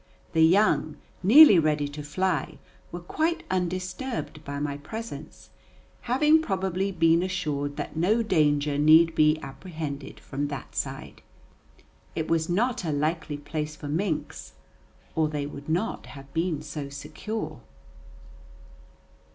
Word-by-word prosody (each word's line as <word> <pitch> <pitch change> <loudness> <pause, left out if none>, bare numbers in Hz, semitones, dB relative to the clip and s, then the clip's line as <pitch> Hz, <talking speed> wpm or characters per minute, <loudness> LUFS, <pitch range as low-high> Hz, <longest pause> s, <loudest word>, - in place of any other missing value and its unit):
The 160 - +3
young, 160 -3 +3 0.2
nearly 220 - +9
ready 150 -2 +1
to 145 +1 -7
fly, 185 +6 -1 0.3
were 175 - -6
quite 325 - -1
undisturbed 185 - -3
by 140 -1 -5
my 145 -1 -2
presence, 220 +11 -8 0.6
having 300 +5 +5
probably 190 - -1
been 165 -1 +3
assured 150 -6 -2
that 150 - -5
no 205 +8 +2
danger 145 -6 +2
need 160 +2 +6
be 155 0 +4
apprehended 140 -1 -7
from 145 +2 -4
that 140 -3 -7
side. - - -5 0.9
It 160 -1 -2
was 165 0 +1
not 220 +5 0
a 160 - -1
likely 150 +1 -1
place 150 +1 -4
for 145 - -8
minks, 165 +1 -3 0.6
or 155 -1 +1
they 145 -2 -3
would 145 +1 -8
not 180 +8 -1
have 135 -1 -12
been 165 -2 -1
so 145 -1 -6
secure. 210 +10 -6
160 Hz, 125 wpm, -26 LUFS, 145-185 Hz, 0.9 s, nearly